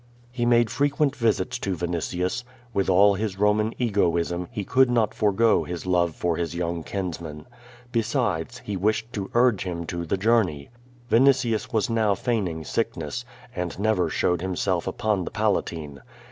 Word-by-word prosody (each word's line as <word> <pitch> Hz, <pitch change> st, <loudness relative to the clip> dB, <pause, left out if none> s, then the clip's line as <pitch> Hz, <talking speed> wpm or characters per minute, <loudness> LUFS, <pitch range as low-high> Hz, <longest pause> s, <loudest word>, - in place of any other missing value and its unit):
He 120 Hz, -1 st, -1 dB
made 120 Hz, -2 st, +4 dB
frequent 145 Hz, 0 st, +1 dB
visits 115 Hz, 0 st, 0 dB
to 95 Hz, -4 st, -2 dB
Vinitius. 90 Hz, +6 st, -2 dB, 0.3 s
With 100 Hz, -3 st, 0 dB
all 100 Hz, +2 st, +6 dB
his 100 Hz, -1 st, -3 dB
Roman 105 Hz, +2 st, +2 dB
egoism, 90 Hz, -6 st, 0 dB
he 105 Hz, -, -4 dB
could 130 Hz, +6 st, +3 dB
not 115 Hz, -3 st, +2 dB
forgo 110 Hz, +2 st, +3 dB
his 90 Hz, 0 st, -6 dB
love 85 Hz, -3 st, +1 dB
for 85 Hz, -2 st, -1 dB
his 85 Hz, 0 st, -3 dB
young 85 Hz, -1 st, -2 dB
kinsman. 85 Hz, -5 st, -5 dB, 0.5 s
Besides, 115 Hz, -, -1 dB
he 105 Hz, -, -3 dB
wished 110 Hz, +5 st, 0 dB
to 100 Hz, -4 st, -4 dB
urge 120 Hz, -4 st, +4 dB
him 85 Hz, -2 st, -4 dB
to 85 Hz, +1 st, -4 dB
the 85 Hz, +4 st, -1 dB
journey. 95 Hz, -9 st, +1 dB, 0.4 s
Vinitius 125 Hz, -1 st, +3 dB
was 115 Hz, +1 st, +1 dB
now 110 Hz, -4 st, +2 dB
feigning 95 Hz, -7 st, -2 dB
sickness, 80 Hz, +9 st, -3 dB, 0.3 s
and 90 Hz, -1 st, -3 dB
never 105 Hz, -2 st, +1 dB
showed 90 Hz, -1 st, 0 dB
himself 95 Hz, -1 st, -1 dB
upon 105 Hz, -1 st, 0 dB
the -, -, -4 dB
Palatine. 80 Hz, -9 st, -2 dB
100 Hz, 155 wpm, -25 LUFS, 85-115 Hz, 0.5 s, all